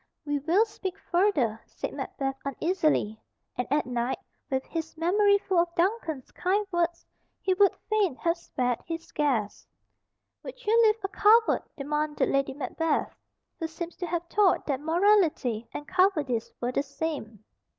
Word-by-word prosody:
"We 290 -1 0
will 340 +10 +3
speak 390 -3 -6
further," 335 - +1
said - - -6
Macbeth 270 -1 -3
uneasily, 295 - 0 0.3
and 250 - -2
at 295 +1 +2
night, 245 0 -1 0.3
with 265 -1 -1
his 325 -1 -5
memory 405 +5 +4
full 380 -3 0
of 340 0 0
Duncan's 340 - -1
kind 395 +4 0
words, 345 -1 0 0.3
he 380 - +1
would 400 +1 +4
fain 420 - +1
have 335 +4 0
spared 250 -8 -2
his 330 0 -6
guest. 255 -9 -1 0.7
"Would - - -10
you 430 +2 +3
live 430 - +4
a - - 0
coward?" 435 +3 +4 0.2
demanded 300 +1 -1
Lady 275 -1 0
Macbeth, 300 +3 -1 0.4
who 325 - -2
seems 335 +1 -7
to 355 - -4
have 340 0 -1
thought 390 +2 +2
that 275 -3 -1
morality 320 - +2
and 295 - -7
cowardice 310 - +1
were 245 +1 -1
the 265 - +1
same. 280 -7 -5
325 Hz, 150 wpm, -27 LUFS, 275-380 Hz, 0.7 s, memory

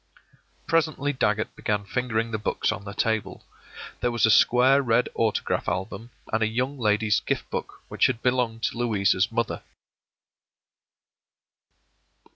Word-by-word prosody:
” - - -38
Presently 155 -3 +1
Dagget 105 -4 -1
began 105 -1 -2
fingering 115 +1 -2
the 110 - -2
books 105 - -1
on 105 - -6
the 100 - -7
table. 110 -1 -2 0.5
There 120 - 0
was 120 -2 +2
a 110 - +4
square 130 +5 +5
red 120 -1 +1
autograph 110 -2 0
album, 95 +5 -4 0.2
and 110 - +1
a 110 - +3
Young 130 +5 -2
Lady's 105 -1 +2
Gift - - -3
Book - - -5
which - - +2
had 120 -3 -4
belonged 125 -3 0
to - - -1
Louisa's 100 -3 +1
mother. 115 -1 -2
115 Hz, 140 wpm, -25 LUFS, 105-125 Hz, 0.5 s, square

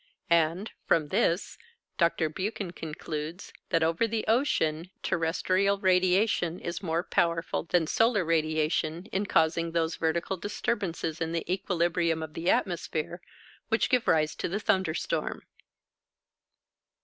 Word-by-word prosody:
And, 170 +5 +2 0.2
from 155 -3 +2
this, 170 +6 0 0.4
Dr. 170 -1 +2
Buchan 190 +3 -4
concludes 160 +1 -6 0.2
that 165 - +2
over 165 +8 +2
the 225 0 -2
ocean 180 - +1
terrestrial 185 +3 +1
radiation 185 -1 +2
is 170 - -4
more 170 -2 -1
powerful 170 -2 0
than 170 -1 +2
solar 225 +1 +2
radiation 155 +1 0
in 200 +1 -1
causing 165 0 +2
those 165 -1 0
vertical 170 +4 -1
disturbances 170 -4 -2
in 165 0 -1
the 165 - -2
equilibrium 170 -3 0
of 155 -1 -7
the 170 +2 -1
atmosphere 175 -1 -1 0.5
which 225 +1 +1
give 250 -2 +2
rise 155 -1 +3
to - - -2
the 195 +4 -1
thunder 190 -7 +1
storm. - - -2
170 Hz, 125 wpm, -28 LUFS, 160-190 Hz, 0.5 s, rise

